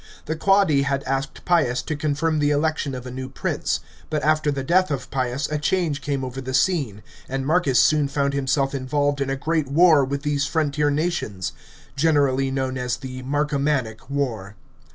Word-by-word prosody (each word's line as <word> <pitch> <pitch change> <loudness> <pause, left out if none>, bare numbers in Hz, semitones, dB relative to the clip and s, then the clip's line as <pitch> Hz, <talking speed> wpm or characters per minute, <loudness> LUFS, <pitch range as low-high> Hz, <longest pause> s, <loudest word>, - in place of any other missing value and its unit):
The 160 - -2
Quadi 195 -4 +3
had 140 0 -1
asked 135 +1 -3
Pius 145 -9 +2
to 155 - -3
confirm 155 +2 0
the 145 0 +2
election 150 -2 0
of 125 0 -7
a 125 - -6
new 130 +1 -6
prince; 135 - -2 0.3
but 150 -1 -1
after 155 0 +2
the 135 -1 -3
death 185 +5 +3
of 135 -4 -4
Pius 130 +1 -1
a 150 - 0
change 155 -2 0
came 140 -2 -2
over 130 +1 -6
the 130 0 -3
scene, 135 - +1 0.3
and 135 0 -2
Marcus 150 -5 +3
soon 150 -2 +4
found 140 0 0
himself 135 0 0
involved 145 +2 0
in 135 - -1
a 135 - 0
great 155 +1 -1
war 155 0 +5
with 140 +1 -3
these 145 -1 0
frontier 150 -2 +1
nations 145 - -2 0.2
— - - -23
generally 140 -3 +2
known 130 -1 -2
as 125 -1 -1
the 130 -2 -7
Marcomannic 140 -4 -1
War. 115 -8 -3
140 Hz, 185 wpm, -23 LUFS, 130-150 Hz, 0.3 s, war